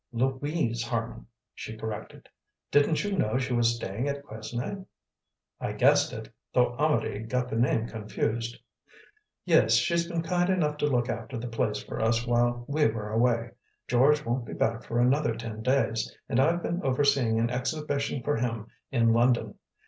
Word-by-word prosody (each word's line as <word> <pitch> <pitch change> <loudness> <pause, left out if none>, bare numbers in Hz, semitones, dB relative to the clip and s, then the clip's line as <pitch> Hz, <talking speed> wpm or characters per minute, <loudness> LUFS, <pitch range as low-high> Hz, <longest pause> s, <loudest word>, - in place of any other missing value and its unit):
"Louise 130 0 -1
Harman," 115 -1 -4 0.3
she 110 - -8
corrected. 110 -1 -7 0.4
"Didn't 145 +4 +3
you 205 -1 -1
know 110 - +1
she 130 -1 -1
was 120 -1 +3
staying 115 +3 -3
at 140 0 -4
Quesnay?" 120 - -5 0.8
"I - - -3
guessed - - +4
it, - - -7 0.3
though 125 -1 +3
Amedee 145 -8 0
got 125 +1 -1
the - - -3
name 115 -1 +2
confused." 115 +1 -3 0.9
"Yes, - - +5
she's 170 -1 +2
been 170 -2 -2
kind 175 +2 +1
enough 155 -6 +1
to 150 - +1
look 125 -4 +1
after 130 - -4
the 120 +2 -5
place 110 -2 -1
for - - -5
us 115 +1 +2
while 120 0 +1
we 150 +1 +3
were 110 -1 -4
away. 115 0 +1 0.4
George 145 +5 +3
won't 120 +1 -1
be - - -6
back 115 +1 0
for 120 - -3
another 125 0 +2
ten 115 -1 -6
days, 125 -2 +1 0.2
and 120 - +1
I've 170 +5 +2
been 175 +2 -2
overseeing 135 -4 +2
an 115 +1 +1
exhibition 140 +1 -2
for 145 +3 0
him 115 -2 -2 0.2
in 115 -3 +3
London. 120 +1 +2
120 Hz, 165 wpm, -28 LUFS, 115-145 Hz, 0.9 s, Yes